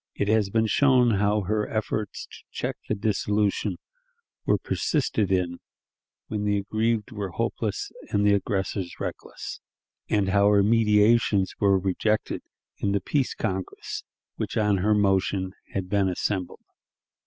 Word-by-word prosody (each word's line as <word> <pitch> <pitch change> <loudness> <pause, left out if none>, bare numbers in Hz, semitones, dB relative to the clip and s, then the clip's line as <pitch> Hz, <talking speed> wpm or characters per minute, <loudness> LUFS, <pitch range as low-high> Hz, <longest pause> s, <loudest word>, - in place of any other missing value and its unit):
It 100 - -1
has 110 -2 +3
been 110 +2 +2
shown 125 +1 +4
how 105 +1 +2
her 105 +2 -1
efforts 110 -1 -3
to - - -13
check - - -3
dissolution 105 0 0 0.7
were - - +4
persisted 115 - 0
in 90 -2 0 0.7
when 105 -1 -3
the 105 0 +1
aggrieved 110 +3 -1
were 105 -3 -4
hopeless 85 - -2 0.2
and 100 0 +1
the 105 - +5
aggressors 95 -2 -1
reckless, - - -6 0.5
and 100 -3 +2
how 100 +1 +4
her 100 -1 +5
mediations 105 -2 +3
were 100 -1 +4
rejected 100 +3 0 0.4
in 100 - 0
the 100 - +2
"Peace 135 +5 -1
Congress," 95 -4 -4 0.3
which - - -3
on 105 -2 +3
her 105 +3 +2
motion 95 -2 +1 0.2
had 95 -2 -2
been 100 0 +2
assembled. 90 0 -3
105 Hz, 135 wpm, -26 LUFS, 95-110 Hz, 0.7 s, the